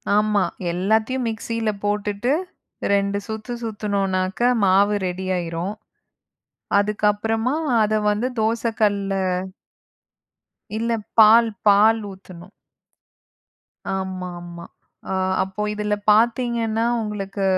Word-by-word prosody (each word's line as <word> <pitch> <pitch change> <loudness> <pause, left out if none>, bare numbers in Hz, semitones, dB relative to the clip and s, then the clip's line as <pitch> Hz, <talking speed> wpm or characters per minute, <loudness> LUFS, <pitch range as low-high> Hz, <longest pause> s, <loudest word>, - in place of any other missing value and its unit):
ஆமா, 210 -1 +3 0.3
எல்லாத்தையும் 220 +7 0
மிக்ஸியில 225 0 -3
போட்டுட்டு 205 +4 -1 0.6
2 200 0 +1
சுத்து 220 +3 -5
சுத்தினோனாக்க 200 0 0
மாவு 200 +2 +4
ரெடியாயிரும். 180 0 -3 1.1
அதுக்கப்புறமா 210 +4 0 0.3
அத 215 +1 +1 0.2
வந்து 220 +5 0
தோச 225 +1 0 0.2
கல்லுல 200 -2 +1 1.6
இல்ல 230 +1 -1 0.3
பால் 225 +1 +7 0.2
பால் 215 +3 +6
ஊத்தணும். 185 0 -13 1.4
ஆமாமா. 180 -2 -6 0.5
அ - - 0 0.3
அப்போ 190 +2 -6
இதில 210 0 -1 0.2
பார்த்தீங்கன்னா, 230 0 +2 0.2
உங்களுக்கு 200 -2 -4
210 Hz, 80 wpm, -22 LUFS, 190-225 Hz, 1.6 s, பால்